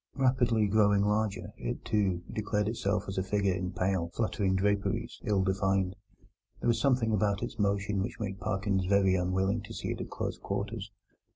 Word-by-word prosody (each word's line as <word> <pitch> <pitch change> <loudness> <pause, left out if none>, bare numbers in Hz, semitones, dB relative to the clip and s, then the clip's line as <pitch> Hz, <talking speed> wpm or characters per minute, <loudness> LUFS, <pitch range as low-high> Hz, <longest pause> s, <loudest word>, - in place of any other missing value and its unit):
Rapidly 125 -5 +3
growing 100 -1 +4
larger, 105 0 0
it, 120 - -4
too, 95 -5 +1
declared 105 -1 0
itself 105 -2 0
as 95 0 -2
a - - +2
figure 100 0 +1
in 90 0 -3
pale, 90 -2 0
fluttering 100 -4 +1
draperies, 100 +4 0
ill 100 -4 +2
defined. 95 -1 +1 0.6
There - - -2
was 115 - +2
something 125 -5 +2
about 105 +1 +1
its 120 -2 -5
motion 100 0 +1
which 95 - -4
made 95 -3 -4
Parkins 95 -2 0
very 100 -1 +4
unwilling 95 +4 +1
to 110 +2 -9
see - - -4
it - - -4
at - - -6
close - - -4
quarters. 105 0 -4
100 Hz, 175 wpm, -30 LUFS, 95-110 Hz, 0.6 s, growing